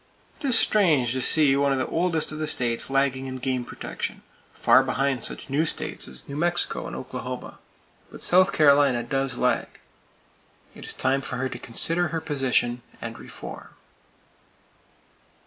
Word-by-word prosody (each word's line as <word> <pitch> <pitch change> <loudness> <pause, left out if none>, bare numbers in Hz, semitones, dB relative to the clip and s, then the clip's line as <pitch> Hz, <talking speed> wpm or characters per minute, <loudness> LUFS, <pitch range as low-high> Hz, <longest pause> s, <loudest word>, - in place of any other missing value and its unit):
It 285 - -3
is 250 -4 +4
strange 155 - +3
to 130 - -2
see 145 0 +4
one 140 0 +2
of 135 - +1
the 130 - 0
oldest 165 -2 0
of 155 - -6
the 155 - -2
states 120 -5 0
lagging 135 -1 +1
in 130 0 -5
game 130 -1 -2
protection, - - -6 0.3
far - - +5
behind 130 -1 -1
such - - -2
new 140 +3 +1
states 160 - -3
as 65 -1 -9
New 140 - -7
Mexico 175 +3 0
and - - -7
Oklahoma; - - -7 0.5
but - - -9
South 185 +2 +5
Carolina 140 -5 +4
does 135 0 -2
lag. 125 0 +1 1.1
It - - -11
is - - -2
time 135 +1 +1
for 135 -2 -5
her 130 +1 -2
to 120 - -7
consider 165 +10 +2
her 165 0 -3
position, 130 -5 0 0.2
and - - -7
reform. - - -10
135 Hz, 165 wpm, -25 LUFS, 130-155 Hz, 1.1 s, far